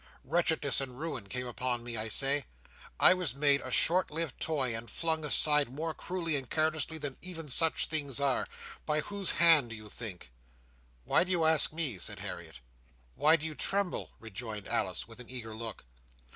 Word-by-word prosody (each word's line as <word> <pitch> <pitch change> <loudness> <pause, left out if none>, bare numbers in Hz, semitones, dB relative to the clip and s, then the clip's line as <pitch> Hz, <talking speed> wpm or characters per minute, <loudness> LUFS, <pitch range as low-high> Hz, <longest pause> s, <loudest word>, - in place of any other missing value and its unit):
Wretchedness 160 -2 +2
and 130 -2 -7
ruin 135 -11 -6
came 125 +4 -4
on 125 -2 -1
me, 120 -1 -6
I 110 0 -1
say. 135 +4 +3 0.5
I - - +7
was 180 -8 -2
made 140 0 +2
a 130 - -6
short 175 +8 +2
lived 160 -2 -4
toy, 135 -7 -1
and 115 +1 -4
flung 160 -1 -1
aside 150 -1 +3
more 155 +5 -4
cruelly 170 -3 -2
and 135 -3 -7
carelessly 160 0 0
than 145 -3 -6
even 165 -4 -6
such 160 +4 +5
things 145 -4 0
are. 140 -2 0 0.4
By 150 0 +1
whose 200 +2 +1
hand 165 -7 +5
do 115 - -7
you 110 -1 -11
think?" 95 - -7 0.7
"Why - - +3
do 185 - -9
you 175 -3 +2
ask 160 -1 +4
me?" 150 - +3
said - - -2
Harriet. - - -8 0.5
"Why 155 - +4
do 160 -1 -3
you 160 - -1
tremble?" 195 +5 -2
rejoined 110 -1 -7
Alice, - - -1
with 115 +1 -13
an 125 - -10
eager 120 -4 -7
look. 110 - -8
145 Hz, 185 wpm, -30 LUFS, 120-160 Hz, 0.7 s, I